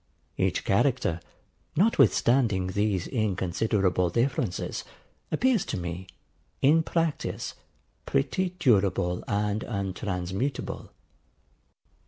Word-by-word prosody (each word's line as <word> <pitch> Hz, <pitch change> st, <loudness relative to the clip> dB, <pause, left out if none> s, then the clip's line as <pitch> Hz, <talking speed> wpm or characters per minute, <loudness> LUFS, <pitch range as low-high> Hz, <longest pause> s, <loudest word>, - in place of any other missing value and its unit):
Each -, -, 0 dB
character, 105 Hz, -, +2 dB, 0.6 s
notwithstanding 120 Hz, -, +3 dB
these 100 Hz, -2 st, 0 dB
inconsiderable 95 Hz, -3 st, +1 dB
differences, 120 Hz, -4 st, -1 dB, 0.5 s
appears 250 Hz, -6 st, +2 dB
to -, -, -3 dB
me, 90 Hz, +1 st, -5 dB, 0.5 s
in 155 Hz, +4 st, +5 dB
practice, 165 Hz, -1 st, -2 dB, 0.5 s
pretty 180 Hz, -, 0 dB
durable 100 Hz, -, +2 dB
and 105 Hz, +1 st, 0 dB
untransmutable. 100 Hz, +3 st, -3 dB
105 Hz, 75 wpm, -27 LUFS, 95-135 Hz, 0.6 s, in